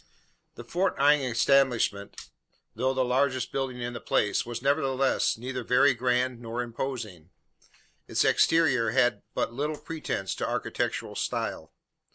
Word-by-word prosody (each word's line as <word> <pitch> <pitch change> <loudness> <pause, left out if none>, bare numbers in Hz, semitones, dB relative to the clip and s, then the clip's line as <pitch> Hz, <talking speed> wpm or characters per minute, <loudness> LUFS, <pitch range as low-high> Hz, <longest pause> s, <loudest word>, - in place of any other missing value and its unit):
The - - -9
Fort 185 -1 -1
Inge 140 -2 +4
establishment, 120 -7 +2 0.5
though 130 +4 -1
the 130 -1 +1
largest 130 0 0
building 130 -2 -3
in 120 0 -4
the 120 - -7
place, 105 - 0
was, 120 -1 -4
nevertheless, 135 -3 +1
neither 125 +1 -5
very 130 +4 +4
grand 125 0 0
nor 120 +1 -3
imposing. 115 - -6 0.8
Its - - +1
exterior 135 -9 +3
had 120 -3 +2
but - - -1
little 150 +4 -2
pretence 150 - -4
to - - -2
architectural - - -2
style. - - -3
125 Hz, 135 wpm, -27 LUFS, 120-135 Hz, 0.8 s, Inge